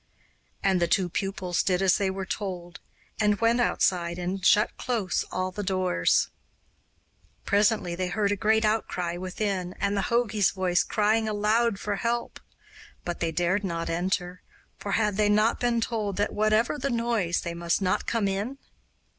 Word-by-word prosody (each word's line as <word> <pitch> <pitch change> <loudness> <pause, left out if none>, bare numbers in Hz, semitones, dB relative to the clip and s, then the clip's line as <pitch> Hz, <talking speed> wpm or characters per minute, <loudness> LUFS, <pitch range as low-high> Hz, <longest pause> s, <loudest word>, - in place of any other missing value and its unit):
And 190 -2 +2
the 170 - +3
two 180 +1 +1
pupils 185 -1 -1
did 180 -2 +1
as 190 0 +3
they 195 -1 +1
were 190 0 -4
told, 180 -3 -5 0.4
and 210 -1 +2
went 230 +1 +3
outside 175 -6 +1
and 180 +2 -3
shut 210 +2 +4
close 225 -8 -1
all 185 0 -2
the 205 - -5
doors. 185 - +1 1.2
Presently 205 -3 +2
they 180 +1 -2
heard 200 +2 0
a - - +2
great 220 +2 +2
outcry 180 -5 -1
within 185 0 -3
and 200 +1 -1
the 200 - -1
jogi's 225 -5 +2
voice 185 -2 +1
crying 215 +1 +1
aloud 215 +1 +1
for 205 -1 -2
help; 235 +2 -2 0.7
but 175 - -3
they 165 -1 0
dared 180 +4 0
not 170 -3 -2
enter, 180 +1 -2 0.3
for 200 - -5
had 210 -3 +1
they 210 -1 +3
not 215 +2 +3
been 240 -1 +1
told 215 -4 -2
that 205 +1 0
whatever 215 +6 +2
the 275 +1 -1
noise, 230 -8 0
they 170 - -4
must 170 0 0
not 185 -2 0
come 225 -4 +1
in? 205 +8 -2
200 Hz, 165 wpm, -27 LUFS, 180-215 Hz, 1.2 s, shut